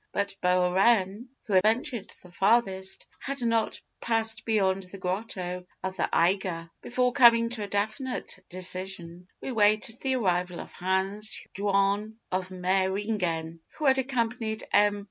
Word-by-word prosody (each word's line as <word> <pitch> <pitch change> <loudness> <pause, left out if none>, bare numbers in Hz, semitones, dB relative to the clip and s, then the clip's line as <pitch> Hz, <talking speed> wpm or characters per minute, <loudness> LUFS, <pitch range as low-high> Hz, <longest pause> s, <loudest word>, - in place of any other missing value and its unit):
But 200 -1 -1
Bohren, 190 +4 +3 0.2
who 210 - -4
had 185 - +6
ventured 225 +2 0
the 180 - -15
farthest, 195 -1 +1
had 275 0 -4
not 230 -2 +1 0.2
passed 225 -1 +1
beyond 195 -4 +2
the 185 +1 -9
grotto 180 -1 -4 0.2
of 190 0 -3
the - - -1
Eiger. 170 -2 +1
"Before 250 0 +1
coming 235 -3 +6
to 235 -2 -5
a 205 - -3
definite 215 +6 -3
decision, 180 -1 -5
we - - -4
waited 215 +1 +2
the 265 -1 +1
arrival 180 -6 0
of - - -8
Hans 190 +3 -1
Jaun 200 +2 +1 0.2
of 185 0 -1
Meyringen, 185 -3 -1 0.2
who 310 - -3
had 265 -1 +5
accompanied 235 -4 -1
M. 205 0 +4
200 Hz, 140 wpm, -28 LUFS, 185-225 Hz, 0.2 s, had